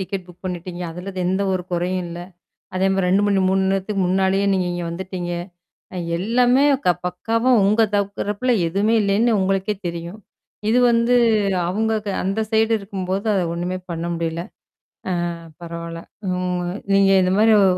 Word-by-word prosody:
Ticket 190 -1 -4
book 180 +1 -17
பண்ணிட்டீங்க. 180 -1 -5
அதுல 180 +4 -7
எந்த 190 +2 +1
ஒரு 185 -1 -1
குறையும் 180 +1 -1
இல்ல? 170 0 -7 0.6
அதே 185 +1 +2
மாரி 190 -1 +1
2 195 +3 +3
மணி 200 -1 +2
மூன் 190 0 +2
நேரத்துக்கு 195 +1 -1
முன்னாடியே 190 +1 +2
நீங்க 185 -1 0
இங்க 175 -1 -3
வந்துட்டீங்க. 180 0 -5 0.6
அ - - -5 0.2
எல்லாமே 245 +7 +3 0.2
க - - +5 0.2
பக்காவா 230 +7 0 0.2
உங்க 215 +3 +4
தரப்புல 205 +4 0 0.2
எதுவுமே 200 +6 +1
இல்லைன்னு 210 +3 +2
உங்களுக்கே 195 +2 0
தெரியும். 170 +3 -5 0.5
இது 235 +3 +4
வந்து 235 +1 +3 0.5
அவுங்க 220 +4 0
க - - -2
அந்த 195 +4 -1
சைடு 220 0 +2
இருக்கும்போது 195 0 -4
அத 195 - +2
ஒண்ணுமே 180 +2 -3
பண்ண 170 0 -3
முடியல. 165 0 -2 0.9
ஆ - - -3 0.3
பரவால்ல. 170 0 -6 0.3
ம். 180 -1 -2 0.2
நீங்க 195 0 +5
இந்த 185 0 +2
மாரி 220 +1 +5
ஓ - - +5
190 Hz, 155 wpm, -21 LUFS, 180-205 Hz, 0.9 s, க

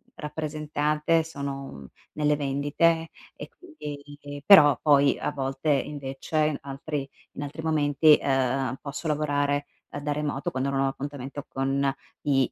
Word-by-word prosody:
rappresentate, 150 +1 -1
sono 140 - -6 0.2
nelle 150 0 +2
vendite 145 +4 +1 0.3
e - - -9
quindi 145 - -9
però 145 -9 +8
poi 140 -2 +4
a - - -1
volte 135 +2 -3
invece, 145 +2 0
altri 140 0 -4 0.3
in 145 - -5
altri 145 +3 -6
momenti, 150 -1 +4
ehm, 135 -1 0
posso 145 +3 -5
lavorare, 145 -1 0 0.2
ehm, - - -6
da 145 +1 -2
remoto 145 -2 -2
quando 130 +1 -2
non 135 - 0
ho 135 - +2
appuntamento 140 0 -6
con 135 +1 0 0.3
i 135 -3 +2
145 Hz, 130 wpm, -26 LUFS, 135-150 Hz, 0.3 s, però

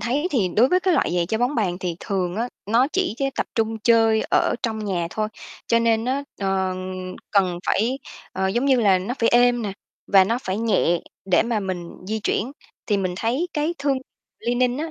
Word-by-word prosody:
thấy 280 +8 0
thì 210 -9 +1
đối 245 +4 +6
với 365 +4 +3
cái 365 -2 +2
loại - - +1
giày 170 -1 +1
chơi 220 +3 -1
bóng 250 +4 +1
bàn 185 -5 0
thì 175 -2 -3
thường 185 -2 -2
á, 235 +2 -1 0.2
nó 235 +5 +3
chỉ 375 - 0
chơ 275 - 0
tập - - -1
trung 225 -1 0
chơi 225 -1 +4
ở - - +3
trong 220 -3 -2
nhà 180 -4 -1
thôi, 215 0 -2 0.4
cho 230 - +3
nên 230 -1 +2
á, 270 +3 0 0.2
ờ, 190 -1 0 0.6
cần 185 -4 +2
phải, 240 +6 +1 0.3
ờ, 190 - 0
giống 240 +7 0
như 265 -3 +4
là, 195 -4 +4
nó 195 +7 -3
phải 230 - +3
êm 245 0 +4
nè, 205 -3 -3 0.3
và 195 -2 +6
nó 230 +5 0
phải 190 +3 -2
nhẹ 200 -7 +2 0.2
để 180 -3 +3
mà 230 -2 -1
mình 180 -3 -4 0.2
di 220 - -1
chuyển. 230 +5 -1 0.3
Thì 205 - +2
mình 185 -2 -1
thấy 250 - -1
cái 310 +3 -1
thương 280 -1 +1 0.4
Li-Ning 245 +2 +1
á, 320 +1 -3
225 Hz, 215 wpm, -23 LUFS, 190-245 Hz, 0.6 s, đối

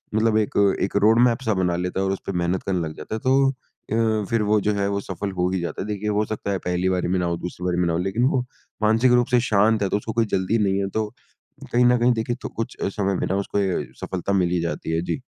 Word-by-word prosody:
मतलब 110 0 +3
एक 105 - +1 0.3
एक 100 - -1
रोडमैप 115 +3 +4
सा 110 - +2
बना 90 -2 0
लेता 90 +2 -2
है। 95 - +1
और 95 - 0
उसपे 95 0 -4
मेहनत 90 0 -1
करने 95 -2 -1
लग 80 - -8
जाता 75 - -5
है - - -3
तो 135 +3 +3
अ, 110 -4 -2
फिर 115 -1 +1
वो 105 +1 +3
जो 105 +1 +1
है, 100 0 0
वो 100 0 -1
सफल 100 +1 -4
हो 90 +1 +1
ही 95 - 0
जाता 85 - -4
है। 100 - -4
देखिए 105 0 -3
हो 105 +1 +1
सकता 105 -1 -4
है 100 - 0
पहली 90 +1 0
बारी 90 -1 0
में 90 +1 +1
ना 90 - 0
हो, 85 -1 -1
दूसरी 90 +1 -6
बारी 90 -1 0
में 90 - +2
ना 85 - 0
हो 80 - 0
लेकिन 110 +6 0
वो 130 - +2 0.4
मानसिक 115 +4 +4
रूप 120 -1 +4
से 125 - +5
शांत 105 +1 +3
है 100 - 0
तो - - +1
उसको 110 +2 -5
कोई 115 0 +2
जल्दी 95 +4 +1
नहीं 95 -1 +1
है। 95 - -2
तो 110 +2 -1 0.6
कहीं 125 +1 +4
न 125 0 +5
कहीं 120 +1 +3
देखिए 115 +1 -2
तो - - -5
कुछ 115 - -5 0.2
समय 100 -1 +1
में - - -1
ना 95 - 0
अ, - - +1
उसको 100 +1 -2
ये 95 -2 0 0.2
सफलता 95 +1 -2
मिल 90 -3 +2
ही 90 -2 +1
जाती 80 -1 -3
है। 80 0 0
जी। 90 - -3
100 Hz, 285 wpm, -23 LUFS, 90-110 Hz, 0.6 s, से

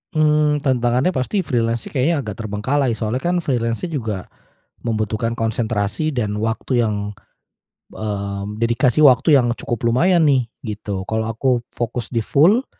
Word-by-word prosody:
Mmm, 150 -1 +3
tantangannya 125 +3 +2
pasti 185 +7 -1
freelance 115 -5 0
sih - - -9
kayaknya 145 +2 +1
agak 105 -2 -7
terbengkalai 115 +5 0
soalnya 110 +3 -2
kan 180 - +1
freelance-nya 120 +5 -1
juga 110 -10 -2 0.6
membutuhkan 110 0 -1
konsentrasi 115 +4 -1
dan 110 -6 -2
waktu 120 +2 0
yang, 105 -2 0 1.0
eee, 100 -2 -4
dedikasi 120 +5 +3
waktu 140 +3 +6
yang 120 -2 +2
cukup 120 0 -4
lumayan 165 +8 +3
nih 130 -5 +2 0.2
gitu. 105 -3 -4
Kalau 110 +1 -2
aku 120 +2 +1
fokus 120 0 -4
di 115 -3 -1
full 200 - +4
120 Hz, 140 wpm, -20 LUFS, 110-140 Hz, 1.0 s, waktu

